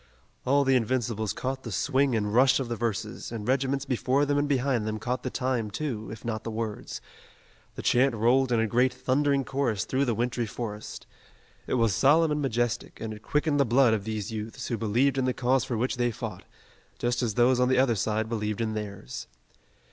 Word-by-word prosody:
All 140 +2 +4
the 135 -1 +3
Invincibles 115 -3 0
caught 130 +1 -3
the 115 - -7
swing 130 +7 +1
and 105 -1 -1
rush 130 +3 +5
of 130 -3 -3
the 120 - -1
verses, 115 -1 -3
and 110 -2 -5
regiments 135 +1 +1
before 130 +2 +1
them 145 0 +1
and 145 0 0
behind 130 -5 +1
them 110 0 -2
caught 125 +4 -2
the 130 - -3
time, 125 -4 -1
too, 110 -1 -4
if 110 +1 -9
not 110 -2 -3
the - - -4
words. 110 -1 -4 0.7
The - - -6
chant 125 0 +3
rolled 125 +4 +3
in 120 - +3
a 115 - +2
great 125 +4 +2
thundering 140 0 +1
chorus 130 -7 -1
through 135 +2 0
the 120 -3 0
wintry 120 0 -1
forest. 105 -1 -6 0.6
It - - 0
was 115 -4 +2
solemn 155 - +4
and 150 0 0
majestic, 120 -3 -1
and 110 -1 -4
it 105 - -11
quickened 150 +3 0
the - - +6
blood 125 -1 +4
of 105 -3 -1
these 110 0 -4
youths 110 0 -5
who 120 - 0
believed 125 +6 +2
in 130 - +1
the 130 - 0
cause 130 0 +2
for 120 -4 -2
which 125 +2 -1
they 120 0 +2
fought, 115 -5 -6 0.5
just 120 +1 0
as 115 -5 -1
those 125 +1 +4
on 125 0 +3
the 130 - +3
other 130 -2 +4
side 110 +1 -1
believed 105 -2 -2
in 110 -1 -1
theirs. 100 - -6
120 Hz, 210 wpm, -27 LUFS, 110-130 Hz, 0.7 s, the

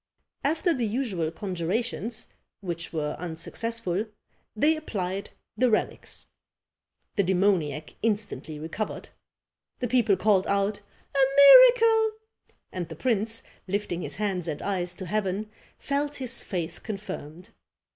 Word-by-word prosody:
After 320 +4 +2
the 245 -6 -1
usual 205 -8 -1
conjurations, 210 +6 -2 0.3
which 170 -4 -5
were 150 -2 -2
unsuccessful, 190 +4 -2 0.5
they 300 +8 +4
applied 200 -9 -3 0.3
the 255 0 +3
relics. 215 - -1 0.9
The 200 - +4
demoniac 180 -6 +1
instantly 210 -8 -2
recovered. 165 +8 -5 0.7
The 250 - -2
people 225 -5 +3
called 195 -1 +3
out 200 +1 +1 0.4
"a - - +2 0.2
miracle!" 450 - +8 0.6
and 175 -3 -4
the - - -7
prince, 225 -2 0 0.2
lifting 185 -2 -2
his - - -5
hands 190 -4 -1
and 150 -3 -3
eyes 180 -3 -1
to 185 - -6
heaven, 210 +2 -2 0.3
felt 285 +1 -1
his 255 -2 -2
faith 170 -4 -4
confirmed. 185 -5 -7
205 Hz, 115 wpm, -27 LUFS, 180-235 Hz, 0.9 s, miracle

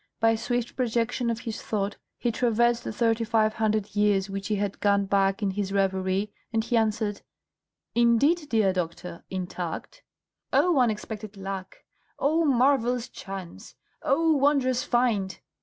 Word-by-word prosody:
By 225 0 +4
swift 240 +1 -2
projection 240 0 0
of 230 0 -2
his 225 -2 -5
thought 205 -1 -2 0.2
he 240 - 0
traversed 235 0 +2
the - - -4
thirty 225 +1 +1
five 220 -1 +2
hundred 215 -2 -1
years 200 -2 +2
which 195 0 -4
he 215 - 0
had 200 -1 -2
gone 200 -1 +2
back 195 +1 +1
in 195 - +1
his 195 0 -3
reverie, 195 +1 0 0.2
and 225 -1 +1
he 240 +1 -1
answered, 215 -2 0 0.7
"Indeed, 280 +7 +3
dear 215 -4 +3
doctor, 170 -1 -4
intact?" 185 - -5 0.5
"Oh, 350 -6 +4
unexpected 215 -3 -2
luck! 195 -1 -6 0.3
oh, 320 +4 +2
marvellous 250 -3 +2
chance! 190 -3 -9 0.3
oh, 320 +3 +3
wondrous 275 -3 +2
find!" 225 -6 0
220 Hz, 140 wpm, -26 LUFS, 195-240 Hz, 0.7 s, By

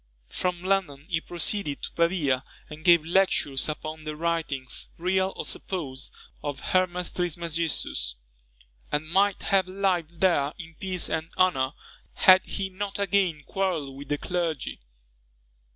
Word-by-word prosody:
From 180 -1 -2
London 185 -7 0
he 160 -3 0
proceeded 175 -2 -1
to - - -4
Pavia, 170 -7 +1 0.3
and 155 +1 -9
gave 170 -3 +6
lectures 165 -6 +3
upon 155 +1 -5
the 155 0 -4
writings, 160 -5 -2
real 190 +2 +1
or - - -4
supposed, 135 -9 -3 0.3
of 145 -2 -4
Hermes 180 -1 +1
Trismegistus; 170 - -1 0.8
and 150 +1 0
might 195 +4 +2
have 190 -2 +3
lived 180 -4 -1
there 155 -6 +3
in 165 -2 -9
peace 185 -2 0
and 160 0 -2
honour, 150 -8 +3 0.4
had 185 0 +7
he 195 -1 -2
not 195 +1 -4
again 195 -6 +1
quarrelled 170 -8 -1
with 140 0 -9
the 145 - +1
clergy. 170 -3 -2
170 Hz, 135 wpm, -27 LUFS, 150-185 Hz, 0.8 s, had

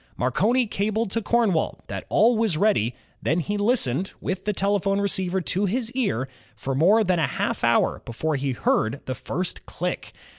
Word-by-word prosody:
Marconi 210 - +2
cabled 215 0 -1
to 230 - 0
Cornwall 215 -7 +1
that - - -6
all 235 +3 +4
was 220 -7 +1
ready, 140 - +2 0.3
then 165 +4 +1
he 205 +5 -2
listened, 205 - +1
with 190 0 -4
the 210 - +1
telephone 200 0 +1
receiver 190 -2 0
to 190 +3 0
his 230 +4 -1
ear, 200 - -1 0.3
for 135 - -3
more 190 +11 +4
than 180 -3 +1
a 155 - +2
half - - -2
hour 115 0 +2
before 150 +6 -2
he 135 -1 -1
heard 120 +1 0
the 130 - -2
first 175 +8 -4
click. - - -4
190 Hz, 175 wpm, -24 LUFS, 145-215 Hz, 0.3 s, all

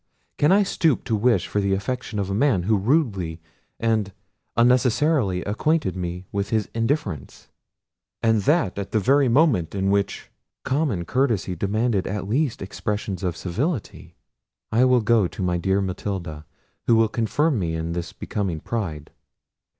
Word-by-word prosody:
Can 150 - +4
I 200 +2 +5
stoop 165 -6 +1
to 115 - 0
wish 115 +3 +2
for 105 - -1
the 100 0 +1
affection 120 +3 -3
of 100 -1 -2
a - - 0
man, 110 -4 +2
who 110 +4 +2
rudely 100 - 0 0.4
and 110 -3 0 0.5
unnecessarily 125 - +3
acquainted 110 - 0
me 90 0 -4
with 100 0 -2
his 110 -2 0
indifference? 115 - -3 0.7
and 115 -2 +3
that 125 - +1
at 100 0 -6
the 110 - +3
very 135 +6 +3
moment 120 - +2
in 95 0 +1
which 100 -1 -1 0.3
common 130 - 0
courtesy 115 -8 0
demanded 105 +2 0
at 95 -1 -3
least 130 0 0
expressions 100 -1 -4
of 90 -4 -2
civility. 95 - -3 0.6
I 120 +4 +4
will 125 -1 +4
go 110 -3 +3
to 95 - -6
my 90 -1 0
dear 95 +2 +1
Matilda, 90 -5 -4 0.4
who 115 - +5
will 115 0 +4
confirm 120 +6 0
me 80 -3 -1
in 80 +1 -3
this 85 0 -4
becoming 95 -6 -3
pride. 80 -8 -4
105 Hz, 155 wpm, -23 LUFS, 95-125 Hz, 0.7 s, I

